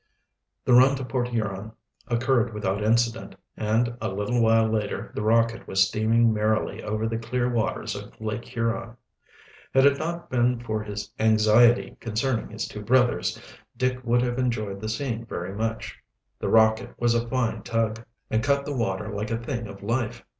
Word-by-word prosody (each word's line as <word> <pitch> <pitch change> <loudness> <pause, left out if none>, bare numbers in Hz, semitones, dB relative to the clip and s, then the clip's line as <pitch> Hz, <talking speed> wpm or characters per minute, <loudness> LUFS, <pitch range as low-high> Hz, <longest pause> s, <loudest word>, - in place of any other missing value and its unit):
The 125 - +3
run 130 +3 +7
to 130 -1 -5
Port 125 0 -1
Huron 110 -3 -3 0.3
occurred 120 -1 +1
without 100 -1 -1
incident, 115 +1 +1 0.2
and 115 +2 0
a 110 - -1
little 105 +5 -1
while 115 0 +4
later 110 -2 -2
the - - -3
Rocket 115 +1 +2
was 95 0 +3
steaming 110 +2 +2
merrily 110 0 0
over 110 +1 -2
the 115 0 -2
clear 120 +2 -1
waters 120 -3 -1
of - - -10
Lake 110 +1 -3
Huron. 115 0 -3 0.8
Had 135 +1 +6
it 140 -1 +4
not 170 +1 -4
been 125 -1 +2
for 110 -2 -3
his 105 0 -6
anxiety 110 +2 +4
concerning 115 +2 -1
his 110 0 -4
two 105 - -8
brothers, 105 -6 +2 0.4
Dick 130 0 -1
would 120 0 +2
have 120 0 -1
enjoyed 110 -6 -2
the 110 - -3
scene 115 0 -3
very 95 -4 -5
much. 110 +1 -4 0.4
The - - -2
Rocket 110 +2 +3
was 120 -1 +3
a 120 0 0
fine 115 -3 -1
tug, 115 0 -1 0.3
and 110 +1 +1
cut 140 0 +1
the 145 - -3
water 105 -2 -2
like 105 +1 -3
a 115 - -1
thing 115 -1 -4
of 100 0 -11
life. 115 +1 -2
115 Hz, 175 wpm, -25 LUFS, 110-120 Hz, 0.8 s, run